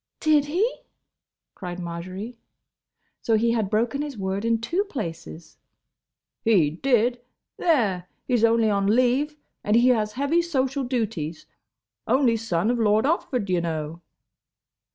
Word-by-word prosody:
"Did 305 -2 +3
he?" 350 +10 +1 0.9
cried 180 -2 -7
Marjory. 185 +7 -6 0.8
So 225 -1 +2
he 230 +2 +2
had 220 -4 0
broken 235 +6 0
his 290 -5 -5
word 195 +1 -2
in 230 0 +2
two 335 - 0
places! 170 - -7 0.8
"He 190 -10 +4
did. 240 - +1 0.4
There! 210 - +1 0.2
He's 245 -3 +1
only 230 -1 +4
on 200 -1 +1
leave, 255 +7 +2 0.3
and 210 - +2
he 240 +2 +5
has 215 -4 +1
heavy 285 +7 +1
social 275 -4 -1
duties. 215 - -3 0.6
Only 255 -3 +3
son 220 -2 0
of 245 - -1
Lord 215 +1 +3
Otford, 265 - 0
y' 180 -2 +1
know." 160 0 -4
230 Hz, 130 wpm, -24 LUFS, 190-260 Hz, 0.9 s, he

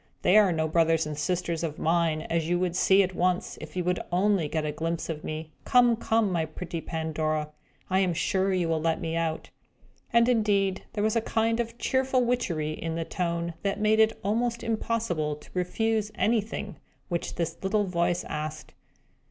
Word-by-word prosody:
They 185 - +4
are 210 -3 +6
no 160 -1 0
brothers 165 0 +2
and 155 -1 -4
sisters 170 +2 -1
of 155 -2 -3
mine, 165 -1 +1
as 165 -1 -1
you 175 - +2
would 180 -1 -1
see 190 +1 +5
at 185 0 -3
once, 180 0 0
if - - -9
you 180 - 0
were 180 +1 +2 0.2
only 190 -1 +2
to - - -4
get 155 -1 -1
a 150 - -1
glimpse 165 +3 -3
of 155 -2 -4
me. 155 0 -5
Come, 245 -1 +5
come, 225 -2 +1
my 170 -2 +1
pretty 165 +1 -5
Pandora! 155 -2 -2 0.4
I 185 +1 +2
am 185 -3 +1
sure 190 +3 +1
you 180 -3 +1
will 160 -1 0
let 165 0 +1
me 165 0 -3
out!" 165 -1 -2 0.6
And, 235 0 +5
indeed, 205 -5 +1
there 210 - -1
was 220 +1 +1
a 230 - +3
kind 225 +1 0
of 230 0 -3
cheerful 260 0 +1
witchery 170 -11 0
in 160 +1 -4
the 165 0 -2
tone, 170 -1 -2
that 200 +1 -1
made 215 +1 +3
it 220 0 +4
almost 235 +4 0
impossible 220 -9 -1
to 150 - -17
refuse 215 +4 0
anything 215 -2 -1 0.3
which 170 -2 -3
this 170 -1 -2
little 205 +2 +2
voice 175 -2 0
asked. 155 0 -5
180 Hz, 195 wpm, -27 LUFS, 160-215 Hz, 0.6 s, are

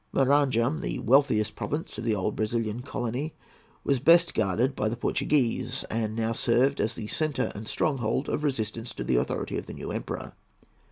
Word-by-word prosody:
Maranham, 135 0 +3
the - - -3
wealthiest 125 -4 +3
province 150 +3 -3
of - - -4
the 115 -2 +1
old 100 +1 -1
Brazilian 110 +1 -1
colony, 130 +3 -3 0.5
was 140 -2 +2
best 170 +5 +5
guarded 110 +6 +1
by 110 - 0
the 115 - -3
Portuguese, 125 0 0
and 110 -1 -1
now 115 0 0
served 125 +4 +2
as 110 - 0
the 110 - -5
centre 155 +6 -1
and 105 +2 -7
stronghold 130 -2 0
of 150 - -1
resistance 115 -4 -2
to - - -4
the 65 - +1
authority - - -1
of - - -10
the - - -7
new - - -6
Emperor. - - -5
120 Hz, 175 wpm, -27 LUFS, 110-140 Hz, 0.5 s, best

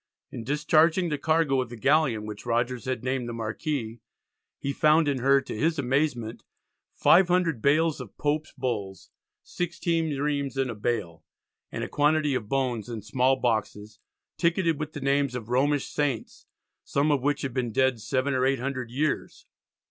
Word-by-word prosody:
In 115 - -6
discharging 155 +5 +2
the 150 -2 -2
cargo 155 -4 +2
of 125 - -5
the 120 - -8
galleon, 135 -3 +2
which 105 -1 -7
Rogers 120 +1 -1
had 130 -3 -3
named 130 -2 -2
the - - -4
Marquis, 115 +1 -3 0.6
he 140 - -3
found 155 +2 +4
in 140 -2 0
her, 135 +2 +4
to 135 - -7
his 160 +8 +1
amazement, 130 -4 -1 0.5
"500 175 - +4
Bales 155 +2 +2
of 120 - -11
Pope's 150 +1 -1
Bulls, 105 -7 -4 0.3
16 165 -4 -2
reams 140 -2 -1
in 135 -2 0
a - - -4
Bale," 105 -7 -3 0.5
and - - -4
a - - -3
quantity 150 0 +2
of 115 -5 -3
bones 125 -5 -1
in 115 -4 -6
small 125 +4 +2
boxes 110 -3 -2 0.4
"ticketed 170 -2 +1
with 155 0 -4
the 145 - -6
names 140 -1 +1
of 115 -2 -6
Romish 140 +3 +2
Saints, 140 -6 -3 0.4
some 145 +2 +1
of 140 -3 +2
which 145 +1 0
had 135 -3 -3
been 120 -2 -1
dead 130 -1 +1
7 130 +5 0
or 130 -1 +1
800 130 -1 -1
years." 145 +5 -2
135 Hz, 165 wpm, -26 LUFS, 120-150 Hz, 0.6 s, found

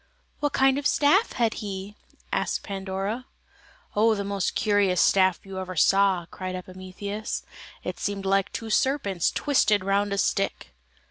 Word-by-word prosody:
"What 290 -1 0
kind 270 +1 +3
of 290 - -8
a - - +6
staff 370 +10 +3
had 230 -3 +1
he?" 200 0 -6 0.4
asked - - -1
Pandora. 195 +4 -4 0.7
"Oh, 220 +1 +4
the 200 - -3
most 200 -2 -2
curious 200 -4 +2
staff 190 -2 +4
you 195 -1 -7
ever 185 -1 -5
saw," 190 +1 +3
cried 185 -1 -5
Epimetheus: 185 +3 -6 0.4
"it - - -5
seemed 200 -1 -3
like 195 0 +1
two 225 -1 -5
serpents 210 - +1
twisted 215 -9 +2
round 200 +1 +1
a 200 - -1
stick." 195 - -1
200 Hz, 150 wpm, -26 LUFS, 190-220 Hz, 0.7 s, a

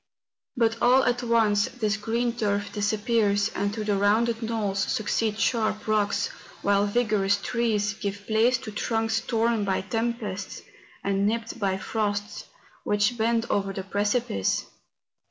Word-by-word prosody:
But 230 -1 +1
all 255 +2 +5
at 245 0 +1
once 220 -4 +3
this 215 -4 -1
green 230 +3 -1
turf 205 -3 -1
disappears, 205 -1 +1
and 200 +1 -1
to 220 - -3
the 210 -1 +1
rounded 225 +3 +2
knolls 215 -4 -1
succeed 215 +2 0
sharp 215 -2 0
rocks, 210 -1 +1 0.3
while 200 0 +3
vigorous 205 -3 +2
trees 215 -3 0
give 200 0 -5
place 230 +3 +3
to 215 - -7
trunks 225 +1 0
torn 230 -1 +1
by 195 -1 0
tempests 220 -2 -3 0.4
and 200 0 +1
nipped 230 +1 -2
by 195 -2 0
frosts, 205 0 -3 0.4
which 205 +3 +1
bend 230 0 +1
over 195 -1 0
the 190 - -4
precipice. 205 - 0
215 Hz, 135 wpm, -26 LUFS, 205-230 Hz, 0.4 s, all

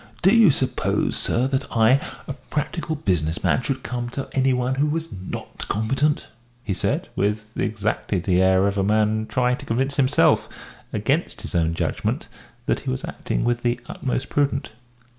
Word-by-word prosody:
Do 195 +5 +6
you 225 -5 +7
suppose, 135 -2 0
sir, 125 - +1
that 135 +1 -1
I, 120 +5 +5 0.3
a 140 - -3
practical 155 +3 -3
business 85 - -1
man, - - +3
should 130 0 -3
come 120 -1 -3
to 135 +2 -4
any 135 0 +2
one 125 0 +1
who 140 +3 +1
was 160 +2 -2
not 95 -1 -7
competent?" 135 +8 +1 0.4
he 105 - -1
said, - - -1
with 105 +2 -1
exactly 105 -1 -1
the 90 +1 +2
air 95 +1 +4
of 100 0 -1
a - - +2
man 110 +1 +2
trying 125 0 +1
to - - -10
convince 135 +5 0
himself 135 0 +3 0.4
against 115 - -1
his 105 - -5
own 85 -2 +1
judgment - - -2 0.4
that - - +1
he - - -5
was 65 - -2
acting - - -2
with 120 0 +1
the 120 0 0
utmost 130 0 -3
prudence. 145 -1 0
120 Hz, 175 wpm, -23 LUFS, 105-135 Hz, 0.4 s, you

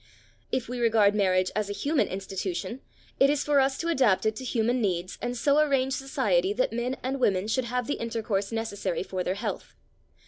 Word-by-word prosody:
If 255 -1 -1
we 250 0 -4
regard 220 -3 +4
marriage 185 -3 +2
as 215 -1 -1
a - - -2
human 290 +7 +1
institution, 190 +4 -4 0.4
it 275 - +6
is 290 0 +1
for 290 -1 +3
us 270 0 +2
to 335 - -3
adapt 255 - +3
it 220 0 +1
to - - -6
human 245 0 0
needs 185 -3 -2
and 245 0 -3
so 285 +4 +3
arrange 270 -3 +2
society 245 - +1
that 250 +1 0
men 240 +2 -1
and 265 +2 -2
women 200 -5 +2
should 245 +3 0
have 250 0 -2
the 285 - -3
intercourse 225 -3 -2
necessary 205 -6 -2
for 185 -1 -3
their 185 - -1
health. 205 - -5
230 Hz, 200 wpm, -27 LUFS, 195-260 Hz, 0.4 s, it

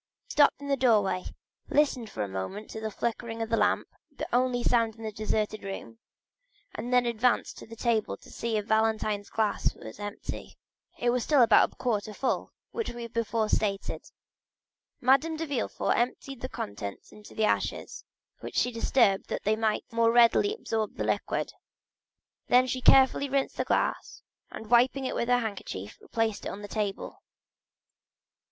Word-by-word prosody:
She - - -12
stopped 290 -2 +5
in 285 - -8
the 280 - +2
doorway, 210 -8 +2 0.4
listened 270 -6 +2
for 105 - -3
a - - -3
moment 95 - -5
to 220 - -6
the 220 - -2
flickering 230 +1 -3
of 225 - -6
the - - +4
lamp, - - +2 0.2
the - - -5
only 245 0 +2
sound 230 -3 +2
in 225 - -11
that 215 -2 -5
deserted 215 0 -1
room, 200 +3 -7 0.7
and 235 +3 -5
then 250 -1 +4
advanced 235 +1 +1
to - - -11
the 230 - -10
table 230 -2 0
to - - -16
see 230 -2 -2
if 210 - -2
Valentine's 220 -2 +1
glass 220 -2 0
were 110 - -10
empty. 205 0 -7 0.4
It 240 0 +1
was 245 -1 0
still 285 -2 +5
about 225 -2 +5
a - - -21
quarter 215 -4 -2
full, 265 - -1 0.2
as 455 - -3
we 240 -1 -5
before 230 -1 0
stated. 200 -2 -1 0.9
Madame 275 +6 +3
de 325 - -2
Villefort 280 -7 -1
emptied 255 +1 -2
the 255 - -4
contents 100 - -6
into 210 -1 -14
the 220 - +2
ashes, - - -1 0.4
which - - -8
she 250 - +2
disturbed 230 -4 +2
that - - -3
they 215 +1 +2
might 220 -1 0
the 230 - -10
more 230 0 +5
readily 240 - +5
absorb 220 - -3
the - - -2
liquid; - - -1 0.9
then 250 +1 +5
she 255 0 -3
carefully 270 +2 +5
rinsed 275 0 0
the - - -1
glass, - - -1 0.3
and 220 0 -9
wiping 255 +3 +4
it - - -2
with 235 - -1
her 245 - +5
handkerchief 200 - -5
replaced 225 -2 -2
it - - -2
on 205 +1 -7
the - - -6
table. 205 -1 -4
230 Hz, 175 wpm, -28 LUFS, 215-250 Hz, 0.9 s, stopped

